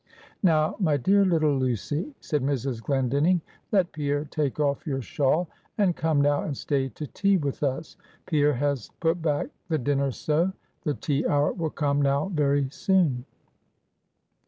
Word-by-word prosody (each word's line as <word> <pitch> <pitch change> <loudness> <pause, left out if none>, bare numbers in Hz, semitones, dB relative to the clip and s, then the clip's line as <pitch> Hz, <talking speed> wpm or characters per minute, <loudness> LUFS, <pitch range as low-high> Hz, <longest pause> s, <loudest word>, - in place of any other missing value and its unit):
"Now, 160 -4 +3
my 155 -7 +2
dear 195 +10 +4
little 160 -6 +3
Lucy," 130 - -1
said 150 -3 -1
Mrs. 135 -3 -1
Glendinning, 140 +7 +2 0.3
"let 190 -5 +2
Pierre 145 0 -1
take 150 -1 -2
off 140 0 0
your 135 -3 -2
shawl, 150 +8 +1 0.3
and 195 -5 +2
come 155 -3 +1
now 145 0 +2
and 140 -4 -4
stay 135 -2 -1
to 150 - -7
tea 200 +6 +2
with 145 -5 -3
us. 140 +1 -2 0.3
Pierre 150 -3 +2
has 140 -2 -1
put 165 +1 +1
back 150 -3 0 0.2
the 160 - +2
dinner 140 +1 +1
so, 160 +8 0 0.3
the 150 -4 -1
tea 145 -2 -1
hour 145 0 +2
will 165 -3 -2
come 145 -1 0
now 140 +5 +1
very 140 -3 +2
soon." 155 -10 +1
145 Hz, 160 wpm, -26 LUFS, 140-160 Hz, 0.3 s, dear